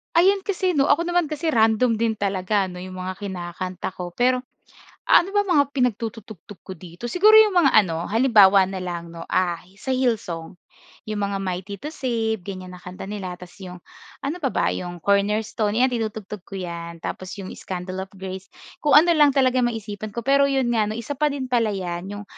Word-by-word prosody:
Ayun 385 +3 +4
kasi 370 -3 0
'no. 280 0 +3
Ako 335 +4 +2
naman 350 0 +2
kasi 310 +2 -3
random 225 -2 +3
din 220 -1 -1
talaga 195 0 0
'no 180 0 -8
'yong 185 0 -8
mga 185 +1 -4
kinakanta 185 -1 -5
ko. 175 -1 -6
Pero 250 +4 +1 0.7
ah, 345 - +7
ano 390 - -9
bang 410 -2 +1
mga 295 -5 +5
pinagtututugtog 220 - -3
ko 190 - -9
dito? 175 +7 -8
Siguro 415 - +5
'yong 435 -3 +7
mga 290 -7 +5
ano, 170 -5 +3
halimbawa 205 -5 +5
na 190 - -5
lang 175 -2 -5
'no, 165 0 -9
ah, 175 -2 0 0.2
sa - - -6
Hillsong. 220 -11 -1 0.6
'Yong 215 - -2
mga 200 -1 -1
Mighty 190 +2 -4
to 300 - -4
Save, 225 - -2
ganyan 185 -2 -7
na 180 - -10
kanta 180 +2 -9
nila 195 -3 -5
tapos 180 0 -13
'yong 180 -3 -10 0.4
ano 295 +6 -3
pa 280 -7 -1
ba? - - +1
'Yong 175 -1 -5
Cornerstone, 210 +2 +1
'yan 260 - +4
tinutugtog 215 -5 -4
ko - - -13
'yan. 170 -3 -6
Tapos 185 +1 -6
'yong 195 -2 -7
Scandal 185 +1 -5
of 190 - -28
Grace. 190 0 -7 0.3
Kung 295 - +1
ano 315 +4 +7
lang 290 -2 +5
talaga 260 -2 +3
maisipan 215 -3 -5
ko. 235 - -3
Pero 275 +3 +4
'yon 270 -3 +1
nga 225 -3 +2
'no, 215 - -3
isa 235 +5 -5
pa 300 -1 +1
din 260 -3 -4
pala 230 -4 +1
'yan, 180 0 -4
'yong 205 0 -7
210 Hz, 200 wpm, -23 LUFS, 185-255 Hz, 0.7 s, ah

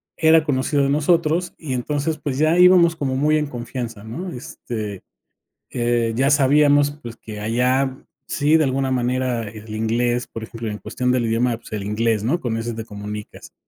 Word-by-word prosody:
era 160 -1 +5
conocido 140 0 +1
de 140 - +1
nosotros 165 +3 +1
y 145 -5 -5
entonces, 145 +5 -2
pues, 135 -3 -3
ya 155 +3 +3
íbamos 180 -2 +6
como 135 -4 -2
muy 150 +3 +2
en 150 - -2
confianza, 120 -4 -6
¿no?, 165 +12 -6
este, 110 - -6 0.7
eh, 120 -1 0
ya 135 +4 +2
sabíamos, 145 +1 +4
pues, 120 -5 -8
que 105 -2 -9
allá 125 +4 +1 0.3
sí 150 +2 +2
de 160 - +3
alguna 135 -1 0
manera 125 -2 -1
el 110 0 -9
inglés, 120 +2 0
por 115 - -8
ejemplo, 115 0 -7
en 105 - -6
cuestión 125 +3 -2
del 125 -2 +1
idioma, 115 +1 +1
pues, 115 -1 -13
el 105 - -3
inglés, 105 +1 0
¿no?, 150 +10 +1
con 115 -6 -2
ese 115 +1 -3
te 110 0 -6
comunicas. 105 0 -8
125 Hz, 180 wpm, -21 LUFS, 115-145 Hz, 0.7 s, íbamos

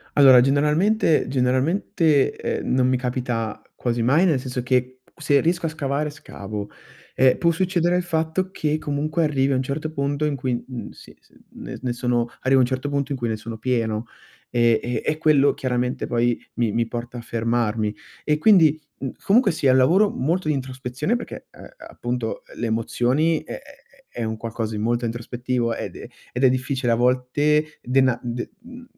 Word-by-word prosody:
Allora, 135 -3 +8
generalmente 150 - +2
generalmente, 140 +4 +1
eh, - - -3
non 130 0 +1
mi 130 - +2
capita 125 -3 -3
quasi 120 -1 -1
mai, 140 +10 +4
nel 150 -7 +2
senso 125 -1 -4
che 130 +1 0 0.2
se 145 -3 +2
riesco 170 +2 0
a - - 0
scavare, 150 -1 -2
scavo. 105 -7 -7 0.4
Eh, 130 -1 +4
può 170 - +2
succedere 175 0 +1
il 180 - 0
fatto 165 +2 -1
che 155 -2 -1
comunque 155 +3 -1
arrivi 140 -2 +1
a - - +2
un 130 - +1
certo 145 +4 -3
punto 140 0 -1
in 150 -2 0
cui, 125 -1 -2
mhmm, 125 -2 -7
si - - -15
s - - -30 0.2
n - - -7
ne 125 -1 -2
sono 120 -1 0
arrivi 135 +1 +3
a - - +6
un - - +5
certo 130 +2 -3
punto 140 0 -2
in 135 - -3
cui 120 - -2
ne 110 - -1
sono 110 +1 -8
pieno. 115 -3 -1 0.5
Eh, 120 -2 +3
e 120 0 -2
e 155 0 0
quello 150 -3 +4
chiaramente 125 -1 -2
poi 120 0 +1 0.2
mi 115 -3 0
mi 115 +1 0
porta 120 +1 -6
a - - -5
fermarmi. 115 -2 -1 0.3
E 150 0 +1
quindi, 160 -5 +5 0.2
mhmm, 135 - -3
comunque 220 +2 +4
sia 140 -4 +2
è - - +5
un 130 - +5
lavoro 185 +11 +4
molto 165 +6 -1
di 155 - +2
introspezione 130 - -2
perché, 240 - -8
eh, - - -14 0.2
appunto 120 -2 -4
le 120 - -3
emozioni 125 +8 +1
è - - -9
è 275 0 -18 0.2
è 120 - -4
un 110 0 -3
qualcosa 115 -1 -4
di - - -3
molto 120 +2 0
introspettivo 120 +1 -2
ed - - -5
è - - -8 0.3
ed 125 - -3
è - - +8
difficile 130 -1 0
a - - +5
volte 135 +5 +1
dena 130 -1 +2
de 120 -1 -5
mhmm, 250 +1 -12
130 Hz, 190 wpm, -23 LUFS, 120-150 Hz, 0.5 s, Allora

